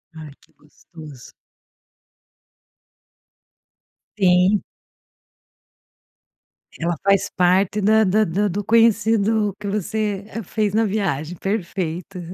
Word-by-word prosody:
Ai, 155 -2 -10
que - - -27
gostoso. 150 -3 -15 2.9
Sim. 185 +1 +3 2.2
Ela 170 +1 -2
faz 195 -1 +2
parte 185 +3 +2
da 220 +2 +4
da 215 +3 +2
da 205 +4 0
do 200 +2 -3
conhecido 220 -2 +2
que 205 - -6
você 205 0 -2 0.2
fez 210 +2 -2
na 225 +1 +2
viagem, 180 -6 -2
perfeito. 185 -2 -4
195 Hz, 90 wpm, -21 LUFS, 175-215 Hz, 2.9 s, da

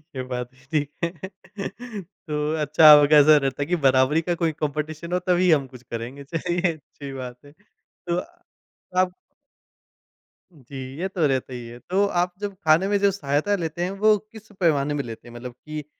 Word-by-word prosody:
ये 130 - -3
बात 125 -1 -4 0.2
ठीक 145 -2 0
है 170 - +2 1.2
तो 150 0 -1
अच्छा 150 +1 +5
आपका 150 0 +7
ऐसा 150 +1 +7
रहता 135 -1 -1
है - - -4
कि 180 - +1
बराबरी 130 +4 +3
का 175 - +2
कोई 165 -2 0
कॉम्पिटिशन 155 +3 -3
हो 180 - +2
तभी 180 -1 +4
हम 140 -4 +3
कुछ 125 -2 -14
करेंगे, 120 +4 -7
चलिए 175 +3 -1
अच्छी 140 -2 -11
बात 125 -2 -7
है 145 - -15
तो 175 -1 -7 0.8
आप 185 -1 +2 1.4
जी, 140 -3 -13 0.2
ये 190 - -2
तो 180 -5 0
रहता 130 -1 -1
ही 120 -1 -6
है। 120 +1 -10
तो 190 +9 0
आप 180 +1 +1
जब 205 -1 -4
खाने 160 +5 +4
में 205 - +2
जो 200 0 +3
सहायता 155 +2 0
लेते 165 -1 -4
हैं, 185 - -2
वो 210 +2 +3 0.2
किस 220 -1 -13
पैमाने 150 -4 +2
में 145 - -1
लेते 115 0 -9
हैं? 120 - -13
मतलब 125 +1 -7
कि 150 +4 -8
150 Hz, 185 wpm, -24 LUFS, 135-175 Hz, 1.4 s, आपका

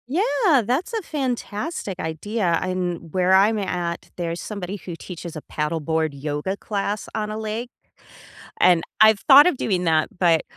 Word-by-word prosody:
Yeah, 360 - +2
that's 280 - -1
a 445 - -1
fantastic 250 - -4
idea, 170 +2 -1
and 180 -3 -3
where 185 0 +3
I'm 205 +3 +5
at, 175 -3 -3
there's 170 -1 -3
somebody 200 -2 -5
who 180 -3 -8
teaches 170 -1 -8
a 155 - -6
paddleboard 160 +1 -1
yoga 150 +6 -3
class 205 0 -3
on 215 -1 -2
a 215 - -4
lake, 220 +2 -4 0.9
and 175 -2 +5 0.2
I've 215 -1 +6
thought 285 +2 +8
of 360 - +2
doing 185 -7 -1
that, 160 -2 +2
but, 170 -3 +3
190 Hz, 155 wpm, -23 LUFS, 170-225 Hz, 0.9 s, thought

